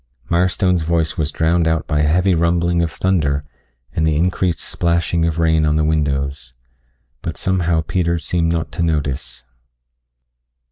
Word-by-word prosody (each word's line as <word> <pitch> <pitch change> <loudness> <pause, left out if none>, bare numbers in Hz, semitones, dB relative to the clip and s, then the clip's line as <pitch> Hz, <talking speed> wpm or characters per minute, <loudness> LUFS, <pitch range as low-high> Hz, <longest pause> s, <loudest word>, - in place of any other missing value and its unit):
Mirestone's 90 0 +2
voice 80 0 0
was 80 -3 -1
drowned 80 +2 +1
out 80 -1 0
by 75 -1 -1
a 75 - +2
heavy 90 +4 +3
rumbling 85 +1 +1
of 85 - 0
thunder 75 -6 0 0.5
and 80 - 0
the 80 -1 +2
increased 90 0 0
splashing 85 -1 0
of 80 -1 -2
rain 80 -1 +2
on 75 0 +2
the 80 - +2
windows. 70 -4 -1 0.7
But - - -5
somehow 85 -3 +1
Peter 85 +1 0
seemed 85 0 -1
not 80 -3 -2
to - - -4
notice. 70 -5 -2
80 Hz, 150 wpm, -19 LUFS, 75-85 Hz, 0.7 s, heavy